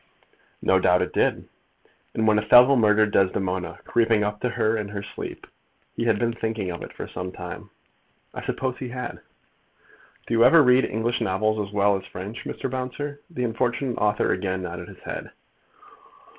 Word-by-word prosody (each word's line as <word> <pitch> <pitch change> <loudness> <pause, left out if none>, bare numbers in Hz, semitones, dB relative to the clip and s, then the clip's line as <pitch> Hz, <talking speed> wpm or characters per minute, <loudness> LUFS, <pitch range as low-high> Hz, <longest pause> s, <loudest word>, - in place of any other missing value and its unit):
"No 95 - +4
doubt 90 -1 +3
it - - -5
did." - - +1 0.7
"And 110 0 +1
when 105 -1 +4
Othello 125 +5 +7
murdered 105 -2 +4
Desdemona, 95 -2 0
creeping 115 -2 +2
up 105 0 -2
to 125 - 0
her 115 -1 +1
in 105 -2 -3
her 100 -1 -6
sleep, 100 - -8 0.5
he 115 - -2
had 115 -3 +3
been 115 +1 0
thinking 110 -5 -3
of 85 - -7
it - - -8
for - - -7
some 90 0 -6
time?" - - -8 0.6
"I - - -6
suppose 130 -1 -3
he 130 - -5
had." 125 +1 -6 1.1
"Do - - -3
you 115 0 +5
ever 145 +6 +7
read 125 0 +5
English 115 +2 -1
novels 105 +2 0
as - - -14
well 100 0 +3
as 95 - -10
French, 100 +6 -7
Mr. - - -4
Bouncer?" 130 +3 -4
The 155 -7 -4
unfortunate 120 +2 -1
author 105 0 +2
again 95 0 -2
nodded - - -6
his - - -13
head. - - -6
110 Hz, 175 wpm, -24 LUFS, 100-125 Hz, 1.1 s, Othello